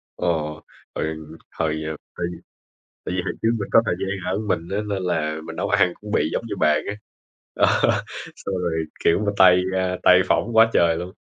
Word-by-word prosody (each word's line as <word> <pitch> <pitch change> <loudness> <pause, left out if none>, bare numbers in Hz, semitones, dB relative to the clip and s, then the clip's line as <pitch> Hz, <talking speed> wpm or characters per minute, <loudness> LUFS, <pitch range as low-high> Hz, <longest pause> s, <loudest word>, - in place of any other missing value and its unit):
Ồ, 80 -3 -1 0.4
hồi 80 0 -2 0.4
hồi, 80 -1 -2
ờm, 80 - -3 0.2
hồi 85 - -1 0.8
tại 90 - -3
vì 90 - -1
hồi - - -2
trước 110 - +3
mình 100 - -4
có 115 - +7
thời - - +1
gian 95 -1 -3
ở - - -1
mình 95 -6 -2
á, 100 - -1
nên 100 -2 -2
là 80 -3 -1
mình - - -8
nấu - - -2
ăn 90 - +3
cũng 105 0 -9
bị 80 - +1
giống 115 - -2
như - - -4
bàn 75 0 +4
á. 100 - -2 0.6
Ờ, - - +3 0.7
xong 95 - -5
rồi, 80 -2 -1 0.2
kiểu 85 - +4
mà, 100 - +1
tay, 90 -1 +7 0.2
a, 90 -1 -1
tay 90 0 +7
phỏng 115 -1 0
quá 115 0 +7
trời 85 -1 +4
luôn. 90 +2 -5
90 Hz, 210 wpm, -22 LUFS, 80-100 Hz, 0.8 s, có